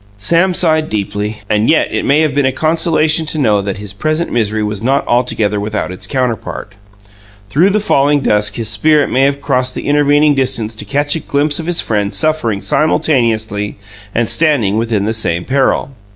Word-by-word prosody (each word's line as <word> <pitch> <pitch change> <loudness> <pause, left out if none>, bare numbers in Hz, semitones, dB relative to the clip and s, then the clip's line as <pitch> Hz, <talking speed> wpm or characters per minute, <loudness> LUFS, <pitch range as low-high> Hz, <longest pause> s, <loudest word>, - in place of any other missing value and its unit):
Sam 170 - +2
sighed 155 -3 +1
deeply, 105 0 -4
and 105 +1 +1
yet 160 - +2
it - - -1
may 145 +3 +3
have 155 -3 0
been 140 -1 +1
a - - +1
consolation 160 +1 +1
to 155 - 0
know 105 -8 +2
that 100 0 -4
his 100 -1 -7
present 155 +10 -2
misery 110 -2 0
was 105 -1 -3
not 135 +4 0
altogether 110 -4 0
without 105 -2 -3
its 95 - -6
counterpart. 115 -6 -3 0.8
Through 170 - +3
the 210 +2 +1
falling 145 -7 +2
dusk 105 -4 +1
his 115 -2 -4
spirit 145 +7 +2
may 130 - +2
have 140 +1 +1
crossed 130 -2 0
the - - -5
intervening 145 +1 +3
distance 130 -5 -1
to - - -4
catch 145 +1 -1
a - - -2
glimpse 145 +1 -1
of 165 - -6
his 175 -1 +2
friend 105 -2 -2
suffering 155 -11 -1
simultaneously 110 -9 0 0.4
and 120 0 +1
standing 125 - +2
within 110 -3 -1
the 110 - -1
same 85 -6 -1
peril. 135 0 0
130 Hz, 185 wpm, -14 LUFS, 105-150 Hz, 0.8 s, may